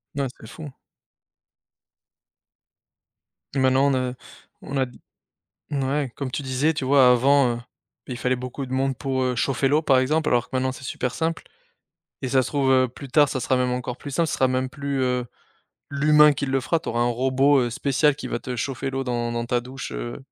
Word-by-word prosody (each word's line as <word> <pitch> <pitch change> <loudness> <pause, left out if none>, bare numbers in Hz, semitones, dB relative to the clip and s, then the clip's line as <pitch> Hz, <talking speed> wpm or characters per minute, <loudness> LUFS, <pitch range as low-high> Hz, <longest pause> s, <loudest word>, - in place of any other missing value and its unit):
N 140 - -1
ouais, 135 - 0
c'est 110 - -12
fou. 150 +6 -9 2.9
Et - - +1
maintenant, 130 +1 +3
on - - +1
a 130 -1 -1 0.5
on 140 - -5
a 135 - +2
des 125 - -15 0.7
n 140 -2 -1
ouais, 135 -1 -1
comme 135 -2 -4
tu 145 - -3
disais, 135 +4 +1
tu 150 - -4
vois, 130 -2 +6
avant, 130 0 +4
heu, - - -6 0.5
il 125 - -5
fallait 125 +1 0
beaucoup 125 +2 -5
de 130 - -11
monde 135 0 0
pour, 135 -2 -2
heu, 125 -1 0
chauffer 135 +2 +1
l'eau 150 +3 +3
par 135 -4 +4
exemple, 150 +4 +1
alors 120 -1 +1
que - - -6
maintenant, 130 0 0
c'est 130 - -11
super 125 0 -3
simple 165 +4 -2 0.8
et 130 - -2
ça 130 0 +3
se - - -4
trouve, 140 -2 +1
heu, 130 -1 +4
plus 135 +3 -11
tard, 145 +2 +4
ça 130 - -3
sera 130 +2 +1
même 125 0 +1
encore 125 0 -4
plus 145 - -8
simple, 165 +4 +1
ce - - -2
sera 130 - +3
même 130 0 -1
plus, 140 -2 -3
heu, 125 -1 0 0.7
l'humain 150 +1 +5
qui 140 0 -3
le 135 0 0
fera, 165 +6 0
tu - - -8
auras 120 - -1
un - - +3
robot, 135 +3 +3
heu, 120 - -1
spécial 140 +4 +2
qui 150 - -7
va - - -2
te 125 - -5
chauffer 135 +3 -3
l'eau 135 0 -2
dans 120 -2 -2
dans 120 0 -3
ta 120 0 +1
douche, 130 +2 -8
heu, - - -5
130 Hz, 220 wpm, -24 LUFS, 125-140 Hz, 2.9 s, vois